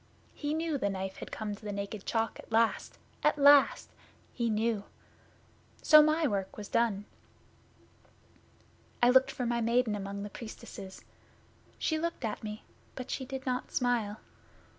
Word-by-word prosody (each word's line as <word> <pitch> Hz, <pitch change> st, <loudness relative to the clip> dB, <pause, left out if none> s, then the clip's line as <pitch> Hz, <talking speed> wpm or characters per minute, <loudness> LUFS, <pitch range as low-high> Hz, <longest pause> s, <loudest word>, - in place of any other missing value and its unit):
He 295 Hz, +1 st, -3 dB
knew 320 Hz, -3 st, -1 dB
the 200 Hz, -, 0 dB
Knife 190 Hz, 0 st, -4 dB
had -, -, -8 dB
come 215 Hz, -1 st, -4 dB
to 205 Hz, -, -11 dB
the 210 Hz, -, -4 dB
Naked 200 Hz, 0 st, -5 dB
Chalk 225 Hz, -1 st, -1 dB
at -, -, -13 dB
last 225 Hz, 0 st, +1 dB, 0.3 s
at 300 Hz, 0 st, +3 dB
last! 285 Hz, -1 st, +5 dB, 0.4 s
He 235 Hz, -2 st, -1 dB
knew! 215 Hz, -1 st, 0 dB, 1.0 s
So 305 Hz, 0 st, +9 dB
my 310 Hz, +1 st, +3 dB
work 195 Hz, -7 st, -2 dB
was 205 Hz, -1 st, -6 dB
done. 210 Hz, -3 st, +1 dB, 2.0 s
I 245 Hz, -, +7 dB
looked 260 Hz, +1 st, +5 dB
for 250 Hz, -, -3 dB
my 235 Hz, 0 st, 0 dB
Maiden 235 Hz, 0 st, +2 dB
among 200 Hz, 0 st, -4 dB
the 205 Hz, -, -7 dB
Priestesses. 195 Hz, -4 st, -9 dB, 0.7 s
She 315 Hz, -1 st, 0 dB
looked 335 Hz, -6 st, -3 dB
at 215 Hz, 0 st, -4 dB
me, 210 Hz, 0 st, -6 dB, 0.3 s
but 255 Hz, -, -6 dB
she 265 Hz, -, -3 dB
did 265 Hz, 0 st, -6 dB
not 250 Hz, -1 st, -2 dB
smile. 235 Hz, -4 st, 0 dB
230 Hz, 155 wpm, -31 LUFS, 205-265 Hz, 2.0 s, So